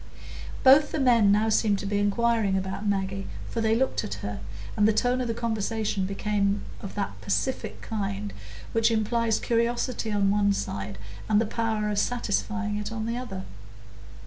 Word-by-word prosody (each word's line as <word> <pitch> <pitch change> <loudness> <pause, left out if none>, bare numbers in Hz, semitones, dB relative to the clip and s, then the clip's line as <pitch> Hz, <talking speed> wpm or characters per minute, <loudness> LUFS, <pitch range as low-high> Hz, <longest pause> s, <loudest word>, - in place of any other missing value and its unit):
Both 280 +3 +7
the 315 - -1
men 235 -6 +5
now 215 +2 +3
seemed 210 -2 +3
to 195 - -5
be 205 +1 0
inquiring 205 -1 +2
about 190 +2 -3
Maggie, 195 -1 -1 0.2
for 230 - -1
they 220 0 +3
looked 265 +3 +1
at 100 - -4
her, 100 -1 -4 0.4
and 210 - +4
the 220 - +4
tone 245 +4 +1
of 250 - -2
the 230 - -2
conversation 220 -3 -1
became 200 0 0 0.2
of 195 - -7
that 200 -1 -3
pacific 255 +6 -2
kind 200 -2 -3 0.4
which 225 0 +3
implies 225 0 +1
curiosity 235 0 0
on 200 -1 +2
one 200 0 +3
side 100 - -4 0.3
and 210 -1 +5
the 225 - +2
power 220 -1 -1
of 205 - +1
satisfying 215 -2 -1
it 210 +1 -4
on 220 -1 -3
the 230 +1 -2
other. 195 -7 -5
215 Hz, 170 wpm, -27 LUFS, 200-230 Hz, 0.4 s, Both